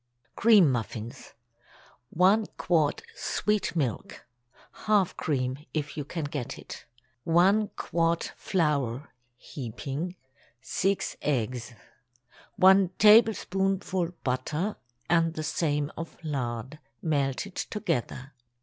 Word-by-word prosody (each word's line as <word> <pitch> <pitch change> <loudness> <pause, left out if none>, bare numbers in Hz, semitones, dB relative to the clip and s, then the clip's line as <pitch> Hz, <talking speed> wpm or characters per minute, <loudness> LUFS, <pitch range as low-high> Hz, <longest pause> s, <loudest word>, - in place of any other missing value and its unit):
CREAM 210 -10 +6
MUFFINS. 115 0 -4
✠ - - -15 0.8
1 195 +7 +3
quart 160 -5 +1
sweet 210 -4 -1
milk 135 -9 -3 0.6
(half 205 -4 +3
cream, 130 -3 -1 0.2
if 150 -1 -2
you 150 - -3
can 160 +3 -5
get 145 -4 -4
it). - - -10 0.4
1 190 +7 +4
quart 170 0 0
flour—heaping. 140 - -3 0.4
6 195 +9 -1
eggs. 125 -3 -2 0.8
1 190 0 +6
tablespoonful 195 -4 +3
butter, 150 +10 -1 0.3
and 165 -1 +2
the 155 - -3
same 150 -2 -1
of 165 0 -7
lard—melted 140 - -3
together. 145 - -3
155 Hz, 90 wpm, -28 LUFS, 130-185 Hz, 0.8 s, CREAM